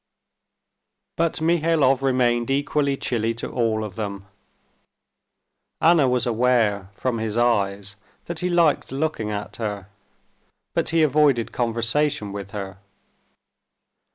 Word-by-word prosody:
But 165 -1 -1
Mihailov 160 -5 +2
remained 125 -3 +1
equally 140 0 0
chilly 115 -3 -1
to 115 - -6
all 115 -3 0
of 105 -3 -6
them. 100 -3 -5 1.5
Anna 160 -5 +4
was 125 -1 +1
aware 115 -5 +1
from 120 0 -2
his 110 0 -3
eyes 100 -4 0 0.3
that 170 -2 -4
he 180 - -1
liked 170 -7 +2
looking 135 -6 -2
at 105 0 -5
her, 105 -4 -4 0.8
but - - 0
he 165 -1 +3
avoided 145 -5 +3
conversation 115 +1 0
with 100 -1 -6
her. 95 -2 -7
120 Hz, 115 wpm, -23 LUFS, 105-145 Hz, 1.5 s, Anna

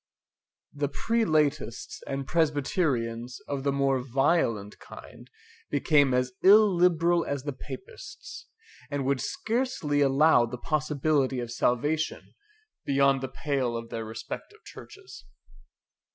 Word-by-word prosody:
The 145 -1 -2
Prelatists 155 - -1
and 135 0 -3
Presbyterians 135 -6 -1
of 140 -1 -3
the 140 - +1
more 135 -1 +1
violent 125 -5 0
kind - - -13 0.4
became 145 -4 +3
as 125 0 +1
illiberal 180 -4 +5
as 140 -2 -4
the 145 -1 -4
Papists, 220 - -10 0.4
and 145 -2 -2
would 135 -1 0
scarcely 235 - -1
allow 140 -2 +4
the 125 +2 -6
possibility 150 -2 0
of 120 -1 -5
salvation 145 +7 -1 0.5
beyond 140 -1 +2
the 130 - -3
pale 130 -5 -2
of 115 0 -8
their 115 - -4
respective 115 - -8
churches. 395 -1 -12
140 Hz, 110 wpm, -27 LUFS, 130-160 Hz, 0.5 s, illiberal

